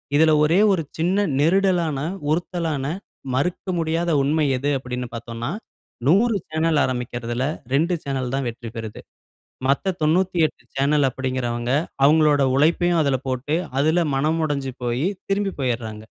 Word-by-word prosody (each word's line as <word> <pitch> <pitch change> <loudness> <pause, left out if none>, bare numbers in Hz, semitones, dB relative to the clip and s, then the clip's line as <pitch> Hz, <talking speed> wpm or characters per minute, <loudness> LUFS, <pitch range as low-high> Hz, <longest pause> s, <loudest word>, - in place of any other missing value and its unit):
இதில 160 +1 +5
ஒரே 165 +6 +3
ஒரு 170 -4 +1
சின்ன 185 +5 +1
நெருடலான, 170 -2 +2 0.3
உறுத்தலான 165 -4 -1 0.5
மறுக்க 175 +8 -1
முடியாத 165 +1 0
உண்மை 150 +2 +2
எது 145 +3 -1
அப்பிடின்னு 125 -2 -5
பார்த்தோன்னா, 115 +3 -5 0.6
100 210 +7 +4
சேனல் 160 -1 +1
ஆரமிக்கிறதுல 120 -1 -2 0.3
2 170 +5 +2
சேனல் 135 -2 -3
தான் 135 -3 -1
வெற்றி 115 0 -8
பெறுது. 110 -2 -6 0.7
மத்த 180 +7 +1
98 170 +1 +1
சேனல் 140 +1 +3
அப்பிடிங்கிறவங்க 125 -2 -2 0.3
அவுங்களோட 150 -1 +4
உழைப்பையும் 170 +3 +3
அதில 135 -3 +1
போட்டு, 130 +4 -1 0.2
அதில 160 +4 +3
மனம் 155 +4 +1
உடஞ்சு 140 -3 -2
போயி, 120 +8 0 0.2
திரும்பி 195 -1 0
போயிட்றாங்க. 115 -4 -3
145 Hz, 125 wpm, -22 LUFS, 130-165 Hz, 0.7 s, இதில